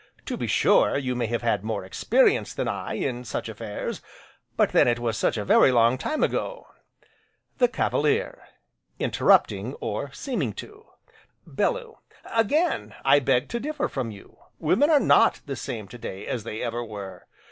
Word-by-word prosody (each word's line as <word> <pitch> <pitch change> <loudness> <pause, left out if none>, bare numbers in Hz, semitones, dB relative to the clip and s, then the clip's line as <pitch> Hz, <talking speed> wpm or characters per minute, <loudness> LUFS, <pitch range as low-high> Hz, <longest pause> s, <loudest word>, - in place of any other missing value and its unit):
To - - -3
be - - -3
sure, - - +3
you 130 -3 -2
may 120 -2 -1
have 120 +1 -2
had 115 -4 +1
more 110 -3 -3
experience 95 - +2
than - - -2
I, - - -3
in 125 -2 -3
such 120 - -4
affairs, - - -5 0.6
but - - +3
then, - - +5
it 120 0 +2
was 120 -2 -2
such 115 - 0
a 105 - -3
very 130 - +5
long 120 +1 +3
time 310 - -1
ago. - - -2 0.9
THE - - +5
CAVALIER: 460 0 0 0.6
(Interrupting, - - +2
or 475 - -4
seeming 185 - -3
to)!!! 420 +2 -11 0.6
BELLEW: 485 -2 -2 0.3
Again, 290 - 0
I 140 +1 +6
beg 125 -2 +1
to 235 - -2
differ 295 +3 -2
from 130 -4 -4
you, 100 -2 -13 0.2
women 285 +11 +2
are 305 -3 +6
not - - +4
the 140 - -4
same 110 -4 -6
to 120 - -11
day 95 -3 -7
as 115 -4 -4
they 110 - -5
ever 120 0 -3
were. 100 -5 -9
125 Hz, 170 wpm, -25 LUFS, -, 0.9 s, I